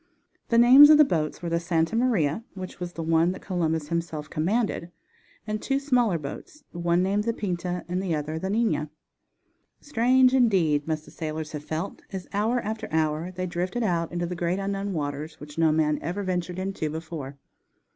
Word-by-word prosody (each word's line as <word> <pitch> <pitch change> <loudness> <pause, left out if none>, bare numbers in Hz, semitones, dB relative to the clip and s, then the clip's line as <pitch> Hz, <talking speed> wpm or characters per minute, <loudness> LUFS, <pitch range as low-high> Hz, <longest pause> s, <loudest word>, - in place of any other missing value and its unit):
The 230 - +3
names 260 +5 +9
of 305 - +8
the 300 - +7
boats 160 - -2
were 170 - -2
the 170 0 +1
Santa 170 +3 0
Maria, 225 - +1
which 185 -2 -8
was 175 -1 -5
the 165 - -5
one 165 +2 +2
that 185 - -11
Columbus 160 -5 -1
himself 160 -3 -3
commanded, 185 +1 -1 0.6
and 215 -1 -3
two 270 - 0
smaller 250 -9 +2
boats, 160 - -9
one 175 +1 +1
named 200 +2 +1
the 230 - +1
Pinta 180 -3 -3
and 180 +1 -2
the 180 -4 -1
other 155 +1 -3
the 190 - -3
Nina. 210 -8 0 0.9
Strange, 255 -1 +3
indeed, 180 - +3
must 155 -1 -2
the - - -14
sailors 155 -1 -5
have 150 -1 -7
felt, 160 +6 -4
as 190 -2 -6
hour 220 +5 +1
after 220 +1 -4
hour 160 +2 0
they 185 0 -4
drifted 180 +6 -2
out 170 -5 0
into 175 0 -2
the 180 +1 -4
great 175 +1 -1
unknown 195 0 -2
waters, 150 0 -4
which 150 +2 -9
no 160 -1 +4
man 155 -1 +1
ever 180 +6 -3
ventured 180 -1 -2
into 185 -4 -3
before. 155 -3 -6
175 Hz, 185 wpm, -26 LUFS, 160-205 Hz, 0.9 s, names